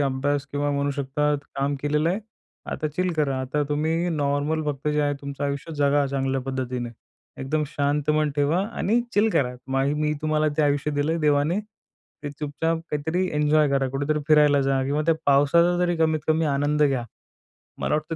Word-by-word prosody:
अभ्यास 140 +1 0
किंवा 145 0 0
म्हणू 140 0 0
शकता 140 +1 0 0.2
काम 140 +1 0
केलेलं 150 +2 +1
आहे. 195 +5 -1 0.5
आता 155 +2 -2
चिल 180 +4 -1
करा. 140 -4 0
आता 135 +3 -1
तुम्ही 160 +4 0
नॉर्मल 145 +1 0
फक्त 145 -1 -2
जे 150 0 +1
आहे, 145 0 +1
तुमचं 140 0 -5
आयुष्य 140 +3 -3
जगा 145 -1 +2
चांगल्या 135 -1 -1
पद्धतीने. 125 -2 -3 0.5
एकदम 150 +4 -1
शांत 145 +1 -1
मन 150 0 +2
ठेवा 145 +5 +2
आणि 230 0 0
चिल 210 +2 +4
करा. 125 -9 +1
मग 135 +1 +1
मी 150 0 0
तुम्हाला 155 0 +1
ते 155 - +3
आयुष्य 145 0 +1
दिलं 145 +1 0
आहे, 165 - -2
देवाने 150 +4 +2
ते 210 -7 -13
चुपचाप 150 +3 -2
काहीतरी 160 +5 -1
एन्जॉय 150 0 +3
करा. 135 -1 +1
कुठेतरी 145 +3 -1
फिरायला 150 -2 +5
जा. 135 0 +1
किंवा 145 +3 0
त्या 165 - +4
पावसाचा 145 +5 +4
जरी 175 -1 +1
कमीत 160 -1 +1
कमी 160 +1 +2
आनंद 145 +2 +1
घ्या. 135 -4 +2 0.7
मला - - -1
वाटतं 155 +2 -3
145 Hz, 180 wpm, -24 LUFS, 140-155 Hz, 0.7 s, फिरायला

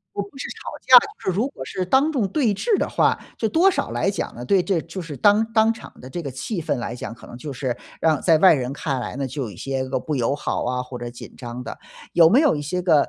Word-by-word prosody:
我 200 - -1
不 200 +7 -12
是 - - -5
吵 - - -10 0.2
架， - - +7 0.3
就 190 - +1
是 - - -5
如 245 +6 +1
果 130 - -8
是 185 +6 -3
当 270 - +3
众 240 -8 +1
对 225 0 +1
峙 425 - +1
的 - - 0
话， - - +2 0.2
这 220 - 0
多 345 - +4
少 - - -2
来 - - 0
讲 200 - -4
呢， 120 - -6
对 185 +6 +3
这 185 -4 0
就 175 +3 -7
是 160 -4 -7
当 205 - +4
当 225 0 +4
场 225 - -12
的 130 - -10
这 175 +5 -5
个 140 - -5
气 165 - -4
氛 - - -1
来 120 0 -4
讲， 120 - -6
可 - - -15
能 120 - -10
就 140 +3 -6
是 130 -2 -3 0.2
让 160 -2 +2
在 165 -3 +5
外 185 +1 +7
人 130 -2 -2
看 140 -3 -2
来 125 - -5
呢， 140 -1 -2
就 135 +2 -4
有 115 - -4
一 95 - -12
些 135 +2 -2
个 130 - 0
不 150 +4 -3
友 130 +1 +1
好 145 - -2
啊， 125 +1 -1
或 125 -1 -8
者 120 0 -5
紧 120 - -11
张 120 0 -7
的。 - - -7 0.3
有 165 -1 +6
没 240 - +6
有 300 -4 +4
一 145 - -3
些 180 +5 -2
个， 160 -5 +3
155 Hz, 305 characters per minute, -23 LUFS, 130-200 Hz, 0.3 s, 架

